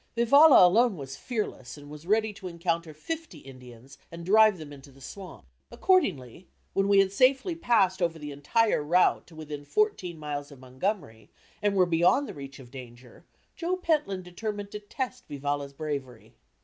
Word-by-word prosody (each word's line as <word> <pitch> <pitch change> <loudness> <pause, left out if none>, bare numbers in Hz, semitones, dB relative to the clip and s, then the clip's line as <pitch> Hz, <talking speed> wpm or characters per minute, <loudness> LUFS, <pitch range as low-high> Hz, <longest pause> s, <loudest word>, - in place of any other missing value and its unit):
Vivalla 280 - +7
alone 215 +3 +3
was 135 -2 -7
fearless 210 - -5
and 145 0 -13
was 150 +3 -11
ready 215 +1 +1
to 190 - -9
encounter 170 -1 -2
fifty 310 - -7
Indians 130 -1 -14
and 170 0 -9
drive 215 +1 +5
them 150 -3 -10
into 140 0 -14
the 135 - -19
swamp. 185 +7 -10 0.2
Accordingly, 185 - 0 0.3
when 195 0 +1
we 200 0 +4
had 195 -1 +4
safely 265 - +2
passed 205 - +2
over 170 -2 0
the 150 -2 -7
entire 210 +9 +1
route 175 +5 +2
to 165 - -16
within 150 -2 -7
fourteen 185 - -1
miles 145 -1 -6
of 140 - -14
Montgomery, 130 - -4 0.3
and 205 -1 +1
were 185 -2 +4
beyond 175 +11 +2
the - - -7
reach 140 -1 -10
of 125 -3 -14
danger, 125 +2 -13 0.3
Joe 360 +2 -2
Pentland 300 - -1
determined 205 +3 -6
to 210 - -6
test 255 +4 -6
Vivalla's 145 0 -3
bravery. 140 -5 -6
175 Hz, 170 wpm, -27 LUFS, 145-215 Hz, 0.3 s, Vivalla